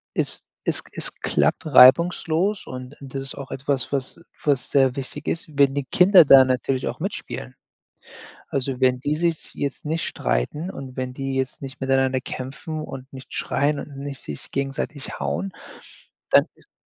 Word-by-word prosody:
es - - +2 0.2
es - - 0
k - - -21
es - - -3
klappt - - +1
reibungslos 170 +7 +5
und 130 +2 -8
das 135 0 -6
ist 135 - -6
auch 135 -2 -8
etwas, 135 -1 -2
was 135 +2 -2 0.2
was 140 -4 +1
sehr 135 -2 +4
wichtig 140 +2 -6
ist, 165 - -1
wenn 140 -1 +5
die 140 -2 -1
Kinder 180 +3 +7
da 135 -1 +9
natürlich 130 0 0
auch - - -4
mitspielen. - - -5 0.9
Also, 135 -1 -2
wenn 130 -1 +3
die 145 +3 0
sich 165 -1 -1
jetzt 140 +1 -4
nicht 160 +2 -1
streiten 150 - -2
und 135 -7 -8
wenn 130 -1 -3
die 135 0 -3
jetzt 130 +1 -2
nicht 135 0 -8
miteinander 135 -1 +2
kämpfen 135 +5 -6
und 135 -2 -9
nicht 130 0 -11
schreien 145 +1 0
und 140 -2 -10
nicht 140 -1 -5
sich 75 - -7
gegenseitig 135 +1 -4
hauen, 195 0 -2 0.8
dann - - +6
ist - - -14
135 Hz, 165 wpm, -23 LUFS, 130-150 Hz, 0.9 s, da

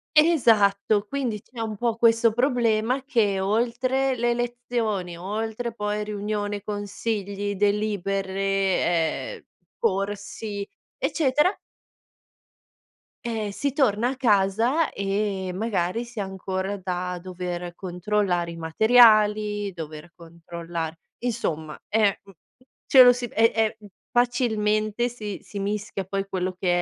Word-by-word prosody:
Esatto, 215 -10 +4
quindi 245 -6 -2
c'è 240 -2 -13
un 220 -1 -3
po' 230 +1 0
questo 230 -1 +4
problema 245 0 +1
che, 215 -8 +1
oltre 245 +6 +1
le 240 0 +1
lezioni, 235 -7 -2
oltre 220 +5 -3
poi 210 -1 -2
riunione, 205 0 -3
consigli, 205 0 -3
delibere, 195 -6 0
ehm, - - -25 0.4
corsi, 200 0 -2 0.3
eccetera 300 +5 +2 1.7
ehm, 220 -3 -2
si 280 +7 -1
torna 245 -4 +2
a 270 - -3
casa 230 +6 +2
e 195 -1 -2
magari 205 +1 -1
si 235 -2 -9
ha 200 - -1
ancora 190 +1 -3
da 180 -1 -3
dover 180 -1 -5
controllare 180 -1 -1
i 165 - -9
materiali, 210 +2 +4
dover 160 -1 -8
controllare 170 -1 -7 0.2
insomma, 160 -11 -3
ehm, 215 -1 +3
u 195 - -14
uhm, - - -25 0.5
ce 265 - +8
lo 245 0 +9
si 245 0 -6
e 225 +1 +4
e, 220 0 +1
mhmm, 210 - -13 0.2
facilmente 225 -2 +1
si 215 -5 -6
si 205 - -10
mischia 200 0 -3
poi 195 +1 -3
quello 185 -1 -2
che 185 - -2
210 Hz, 120 wpm, -25 LUFS, 190-230 Hz, 1.7 s, lo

